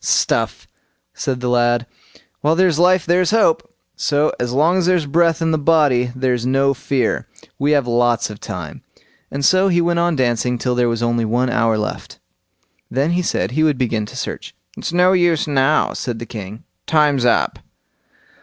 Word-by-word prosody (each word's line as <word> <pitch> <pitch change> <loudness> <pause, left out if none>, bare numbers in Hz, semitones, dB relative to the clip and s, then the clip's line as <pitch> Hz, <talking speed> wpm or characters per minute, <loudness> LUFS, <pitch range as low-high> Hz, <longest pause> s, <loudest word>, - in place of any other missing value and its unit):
"Stuff!" - - 0 0.5
said 130 -2 -3
the 125 - -2
lad; 120 -1 +1 0.5
"while 155 +2 +1
there's 180 -3 +2
life 180 +1 +3
there's 175 +1 +2
hope! 215 -7 +1 0.2
So 145 +1 +1
long 145 +9 +1
as 180 -2 0
there's 180 -4 +2
breath 165 +2 +1
in 160 - +1
the 160 - 0
body 140 -6 +2
there's 125 -2 -1
no 135 +2 +2
fear; 135 -3 -2 0.3
we 145 +2 +2
have 140 -3 +2
lots 120 -2 +1
of 105 - -10
time"; - - -7 0.5
and 140 0 -3
so 185 +1 +4
he 175 -2 +2
went 170 0 +1
on 170 -1 +1
dancing 125 -1 0
till 125 +1 -1
there 120 -1 +1
was 115 0 -2
only 120 0 0
one 120 +3 0
hour 115 -2 +1
left. 105 - -5 0.7
Then 140 +6 0
he 175 +1 +1
said 100 - -2
he 155 +5 -1
would 155 -3 +2
begin 110 -4 -1
to - - -10
search. - - -6 0.2
"It's - - -5
no 180 +2 +3
use 175 -4 +2
now", 140 +1 +1
said 120 -3 -4
the 120 - -7
king; 105 -1 -9 0.2
"time's 150 -4 +2
up." 120 - +1
140 Hz, 180 wpm, -18 LUFS, 120-165 Hz, 0.7 s, so